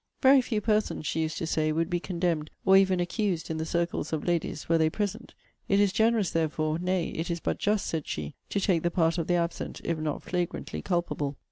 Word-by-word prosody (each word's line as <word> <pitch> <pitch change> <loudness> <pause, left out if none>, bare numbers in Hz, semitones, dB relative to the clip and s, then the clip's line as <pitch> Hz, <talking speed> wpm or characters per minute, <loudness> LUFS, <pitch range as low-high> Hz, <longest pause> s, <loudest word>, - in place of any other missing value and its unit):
Very 270 0 +7
few 225 -4 -2
persons, 210 -6 0
she 160 - 0
used 155 -1 -2
to - - -2
say, 155 -1 +1
would 165 +1 0
be 175 0 -1
condemned, 170 -4 -1 0.2
or 190 - +6
even 190 -1 +5
accused, 175 -2 -1
in 160 - -2
the 160 - -3
circles 170 -2 -1
of 155 -2 -2
ladies, 170 -3 -1
were 165 0 +3
they 160 0 +4
present; 210 +6 -4 0.3
it 200 - +4
is 200 -2 +3
generous, 220 -2 +2
therefore, 155 -1 0
nay, 180 -1 0
it 165 +2 -4
is 170 0 -1
but - - -2
just, 210 0 +1
said 160 -3 -3
she, 75 -1 -4 0.2
to 200 - 0
take 185 -4 +2
the 175 - +1
part 170 0 +1
of 165 - -2
the 175 - +2
absent, 170 0 -2
if 165 -2 -1
not 155 -1 -3
flagrantly 175 -1 -3
culpable. 170 -6 -1
170 Hz, 225 wpm, -28 LUFS, 160-195 Hz, 0.3 s, Very